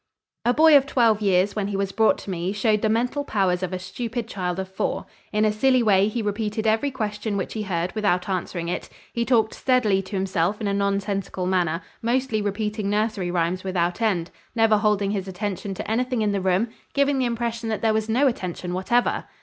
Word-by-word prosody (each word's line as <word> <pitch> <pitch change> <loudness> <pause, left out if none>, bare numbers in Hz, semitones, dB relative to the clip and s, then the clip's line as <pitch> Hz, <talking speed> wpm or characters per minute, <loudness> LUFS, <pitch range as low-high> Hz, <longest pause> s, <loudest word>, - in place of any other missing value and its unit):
A 240 - +5
boy 310 +3 +6
of 275 -1 +5
twelve 230 -6 +3
years 195 0 +2
when 205 -2 -1
he 200 -1 -2
was 195 0 -1
brought 220 +2 +3
to 195 - -4
me 175 +1 -2
showed 210 0 +1
the 220 - +1
mental 245 +6 0
powers 190 -7 0
of 185 - -2
a 185 - -2
stupid 230 +5 -4
child 180 -4 -3
of 190 0 -3
four. 190 - -2 0.3
In 215 0 +2
a 215 - +3
silly 255 +3 +3
way 200 -2 +4
he 220 +1 -2
repeated 210 +1 -2
every 220 +6 +2
question 215 -4 -3
which 190 - -3
he 220 - -3
heard 180 -3 -2
without 200 -5 0
answering 180 -2 -3
it; 180 - -3 0.2
he 235 - 0
talked 230 -3 +2
steadily 225 -7 +2
to 195 +2 -7
himself 190 0 0
in 215 - -2
a 200 - 0
nonsensical 200 -1 -1
manner, 175 -3 0 0.2
mostly 235 -1 0
repeating 210 0 -2
nursery 210 -3 0
rhymes 175 +1 0
without 180 +1 -1
end, 185 -7 0 0.2
never 225 -2 +4
holding 205 -2 +1
his 195 -2 -3
attention 195 0 -4
to - - -6
anything 245 +1 0
in 210 - +1
the 200 -1 -1
room, 190 +5 +1 0.3
giving 280 -1 +2
the 255 - +2
impression 235 -1 -2
that 220 0 -3
there 220 -1 +3
was 220 0 -1
no 250 +6 +3
attention 180 -7 -2
whatever. 215 +7 +1
210 Hz, 210 wpm, -24 LUFS, 190-225 Hz, 0.3 s, boy